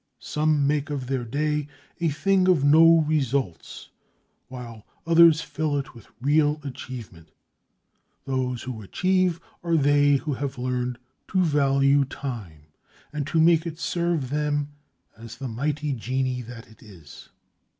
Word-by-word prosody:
Some 150 -1 0
make 145 +1 0
of 140 -3 -3
their 130 -1 -2
day 150 +4 -1 0.3
a 170 -1 +1
thing 185 +5 +2
of 175 -7 +3
no 165 +3 +6
results, 135 - -2 0.6
while 120 -4 -9 0.2
others 165 -1 +6
fill 150 -1 -2
it 140 - -5
with 115 -4 -15
real 150 +3 +2
achievement. 120 - -9 1.0
Those 130 -2 -2
who 125 -4 -6
achieve 185 - 0 0.2
are 170 -1 +2
they 145 0 +4
who 150 +2 -2
have 135 0 -4
learned 125 -1 -2 0.3
to 185 -1 +1
value 140 -2 +3
time, 115 - -7 0.5
and 145 -2 -3
to 160 - 0
make 165 0 +4
it 165 -1 -6
serve 170 -6 -1
them 145 -1 -1 0.5
as 115 +1 -11
the 135 - -5
mighty 145 +5 -2
genie 130 +1 -2
that 120 -1 -10
it 110 - -20
is. 90 -10 -14
140 Hz, 140 wpm, -25 LUFS, 125-155 Hz, 1.0 s, no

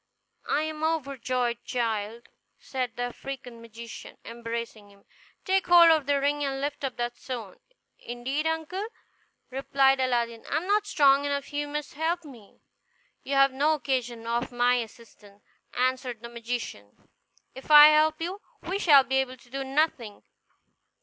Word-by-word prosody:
"I 300 - +1
am 310 0 -5
overjoyed, 255 -6 -1
child," 225 -1 -3 0.3
said 255 -3 -4
the 245 - -3
African 245 -1 -7
magician, 230 0 -10
embracing 230 -2 -6
him. 200 0 -22 0.4
"Take 380 -1 +1
hold 345 -1 +8
of 310 -4 +2
the 285 -1 +2
ring, 290 +1 0
and 270 -1 -2
lift 285 +1 -4
up 265 -2 -3
that 240 0 -3
stone." 230 -8 -7 0.4
"Indeed, 260 +6 -3
uncle," 320 +6 -3 0.6
replied 270 0 +2
Aladdin, 235 -3 -1
"I - - +1
am 330 - -3
not 415 +1 +1
strong 280 -6 +4
enough; 280 0 -3
you 290 0 -2
must 295 0 -5
help 330 +3 -2
me." 235 -8 -15 0.6
"You 275 - -3
have 275 -1 +5
no 295 +4 +2
occasion 250 -5 -3
for 235 +2 -3
my 245 +1 +3
assistance," 220 -3 -10 0.3
answered 255 -2 -1
the 235 - -7
magician; 235 - -6 0.5
"if 265 - -12
I 300 0 +10
help 310 0 +3
you, 365 +5 -4 0.2
we 380 +3 -2
shall 290 -8 +7
be 265 +1 -1
able 260 -1 -1
to 245 - -22
do 270 0 -3
nothing. 265 -6 -1
265 Hz, 155 wpm, -27 LUFS, 235-295 Hz, 0.6 s, I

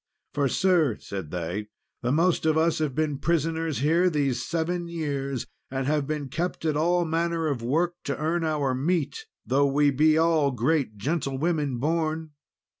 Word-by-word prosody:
"For, 140 -1 +1
sir," 165 - +2
said 95 -6 -6
they, 90 +5 -4 0.3
"the 125 - 0
most 165 +2 +2
of 155 0 +3
us 165 0 +2
have 150 -4 -1
been 150 -2 0
prisoners 165 -2 0
here 165 +5 +3
these 140 -6 0
seven 170 +1 -2
years; 140 -6 -3 0.2
and 135 0 -2
have 145 0 0
been 150 -2 -3
kept 170 +5 -3
at 155 -2 +1
all 175 +3 +2
manner 165 0 0
of 140 -6 -1
work 160 +9 +1
to 140 - -2
earn 165 +3 0
our 150 -4 0
meat, 170 - -1 0.2
though 140 +2 +3
we 145 +1 +3
be 155 +3 +4
all 160 -3 +3
great 125 -2 0
gentlewomen 145 - -1
born. 160 +2 -1
155 Hz, 165 wpm, -26 LUFS, 135-165 Hz, 0.3 s, be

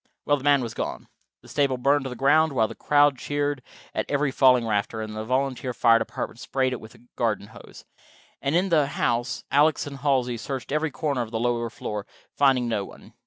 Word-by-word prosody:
Well, 145 - +3
the 135 - -10
man 140 -2 +4
was 115 - -5
gone. - - -5 0.3
The - - -15
stable 140 -3 +1
burned 140 +2 +2
to - - -3
the 125 - -6
ground, 145 +4 +3
while 110 -4 +2
the 115 - -8
crowd 145 +1 +3
cheered 145 -1 -2 0.3
at - - -3
every 145 -1 +1
falling 130 -3 +4
rafter, 110 0 -1
and 110 0 -5
the 110 - -4
volunteer 130 0 -1
fire 115 -1 +5
department 115 - -5
sprayed 130 0 -1
it 125 - -5
with 110 - -13
a - - -20
garden 105 -3 -1
hose. 110 - -14 0.6
And 140 +3 0
in 185 +3 +2
the 155 -5 +3
house 120 -3 -1
Alex 150 +2 +3
and 140 -1 -7
Halsey 130 -4 0
searched 130 +4 -5
every 155 +2 0
corner 140 -2 -2
of 115 - -4
the 110 0 -3
lower 120 0 0
floor, 105 -2 -6 0.3
finding 135 -3 +3
no 110 -4 -1
one. - - -13
130 Hz, 215 wpm, -25 LUFS, 115-145 Hz, 0.6 s, fire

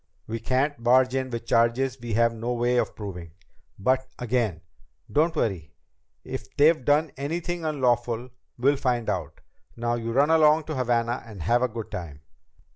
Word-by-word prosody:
We 115 +1 -4
can't 130 +3 0
barge 130 +1 +4
in 130 -1 -1
with 115 -1 -5
charges 120 +3 +2
we 115 -3 -3
have 115 0 +3
no 115 +2 -3
way 120 +1 +1
of - - 0
proving. 90 -6 -7 0.4
But 130 +5 +1
again, 115 -8 -1 0.5
don't 160 +3 +2
worry. 90 - -2 0.5
If - - -7
they've 155 -1 +5
done 145 +3 +2
anything 170 +4 -3
unlawful, 125 -4 0 0.3
we'll 135 +4 +3
find 125 -4 0
out. 80 -5 -5 0.3
Now 120 0 -1
you 115 -1 -3
run 140 +6 +3
along 155 0 +5
to 155 0 -5
Havana 120 -1 0
and 105 -7 -9
have 120 +7 +2
a 125 - +3
good 115 -2 -7
time." 75 -5 -7
120 Hz, 165 wpm, -26 LUFS, 115-135 Hz, 0.5 s, they've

